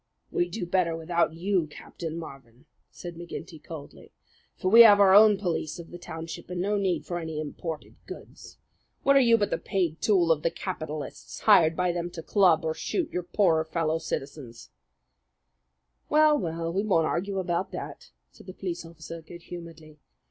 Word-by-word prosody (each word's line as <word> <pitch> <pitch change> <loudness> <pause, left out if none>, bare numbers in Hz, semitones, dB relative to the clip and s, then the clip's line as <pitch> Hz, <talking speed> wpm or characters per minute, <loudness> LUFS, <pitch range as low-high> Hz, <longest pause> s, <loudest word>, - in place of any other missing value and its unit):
"We'd 175 - 0
do 180 +1 -4
better 175 -2 +1
without 165 0 0
you, 180 -1 0
Captain 160 +2 -8
Marvin," 135 -6 -11 0.2
said 175 -1 -9
McGinty 170 -1 -9
coldly; 155 -4 -11 0.4
"for 185 - -1
we 230 +2 +10
have 210 -3 +8
our 195 -2 +6
own 210 0 +7
police 170 -5 -3
of 170 -1 -11
the 175 - -9
township, 165 -1 -8
and 180 -1 -4
no 200 +3 0
need 190 -5 0
for 175 -1 -3
any 160 -2 -5
imported 155 +1 -6
goods. - - -11 0.5
What 275 - +4
are - - +8
you 235 -3 +5
but 205 -2 -1
the - - 0
paid 175 -5 -2
tool 180 -6 +3
of 155 -2 +2
the 165 - +1
capitalists, 155 -5 -6
hired 165 -7 +5
by 180 0 +1
them 175 0 -3
to 165 - -7
club 175 -4 +3
or 160 - 0
shoot 340 - -3
your 180 - -2
poorer 175 -2 +2
fellow 160 0 -1
citizen?" 140 -5 -5 1.6
"Well, 305 0 +5
well, 165 - -3
we 195 +2 0
won't 175 -7 +2
argue 195 +5 -2
about 185 0 -1
that," - - -7 0.2
said - - -17
the 185 - -8
police 180 -4 -5
officer 165 0 -10
good 170 +2 -12
humouredly. 165 -3 -11
170 Hz, 175 wpm, -27 LUFS, 160-190 Hz, 1.6 s, we